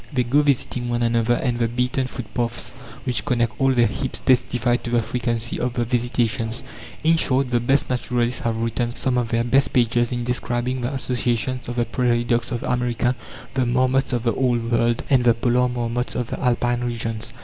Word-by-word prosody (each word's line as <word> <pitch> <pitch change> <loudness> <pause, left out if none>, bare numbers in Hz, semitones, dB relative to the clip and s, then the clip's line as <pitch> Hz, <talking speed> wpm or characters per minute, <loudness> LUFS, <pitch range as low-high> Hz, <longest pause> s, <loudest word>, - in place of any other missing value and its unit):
They 130 -4 +1
go 135 +5 +3
visiting 125 -3 0
one 120 0 0
another, 115 0 +2
and 120 -2 -1
the 115 - +2
beaten 125 +2 -1
footpaths 120 -1 -3 0.3
which 120 -7 -1
connect 120 0 0
all 135 0 +4
their 120 -2 +4
heaps 130 +2 -3
testify 125 -1 +2
to 120 - -7
the 120 -1 +2
frequency 115 -1 -2
of 125 0 -1
the 120 - 0
visitations. 120 0 0 0.4
In 165 +1 +4
short, 130 -4 +1
the 120 - +3
best 135 +4 +2
naturalists 125 -1 0
have 115 -1 -1
written 115 +1 -1
some 130 -1 -1
of 120 -2 -2
their 115 0 +1
best 135 +4 +2
pages 120 -1 +2
in 120 -1 -2
describing 125 +1 -1
the 120 +2 -2
associations 125 -1 -1
of 120 - -4
the 120 -1 +1
prairie 120 -1 +1
dogs 120 0 0
of 120 -2 -3
America, 125 0 0 0.4
the 130 -2 +1
marmots 130 +2 +2
of 120 -2 -1
the 115 -2 +1
Old 120 -2 0
World, 115 0 +2
and 130 -3 +3
the 120 -2 +4
polar 125 +1 +2
marmots 120 0 -2
of 120 -2 -3
the - - -3
Alpine 120 -1 +1
regions. 115 -2 -4
120 Hz, 195 wpm, -22 LUFS, 120-125 Hz, 0.4 s, all